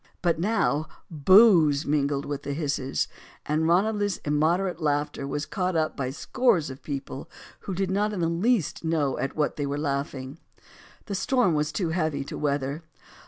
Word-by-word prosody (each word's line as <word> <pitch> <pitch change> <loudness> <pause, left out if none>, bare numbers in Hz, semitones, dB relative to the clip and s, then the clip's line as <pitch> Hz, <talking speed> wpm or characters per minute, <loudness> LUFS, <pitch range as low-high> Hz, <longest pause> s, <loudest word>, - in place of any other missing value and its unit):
But 170 -2 +2
now 175 -6 +1 0.2
"boos" 165 -2 +6
mingled 145 -1 0
with 145 -1 -4
the 140 - -4
hisses. 140 -3 -1 0.4
And 155 +2 +1
Ranelagh's 205 +3 +2
immoderate 165 +4 +1
laughter 145 -2 -1
was 145 +2 -3
caught 185 -1 -2
up 155 -1 0
by 135 -3 -2
scores 170 - +1
of 130 - -10
people 140 -2 -6 0.4
who 190 - -2
did 190 0 -1
not 205 +2 +1
in 205 - -4
the 165 - +2
least 180 +3 0
know 155 -4 0
at 135 - -3
what 150 -1 0
they 145 -1 -1
were 140 +1 -2
laughing. 140 0 -3 0.7
The 205 - -5
storm 240 -1 +2
was 150 0 0
too 175 0 -1
heavy 155 -4 -1
too - - -7
weather. 140 +1 -1
155 Hz, 165 wpm, -26 LUFS, 145-185 Hz, 0.7 s, boos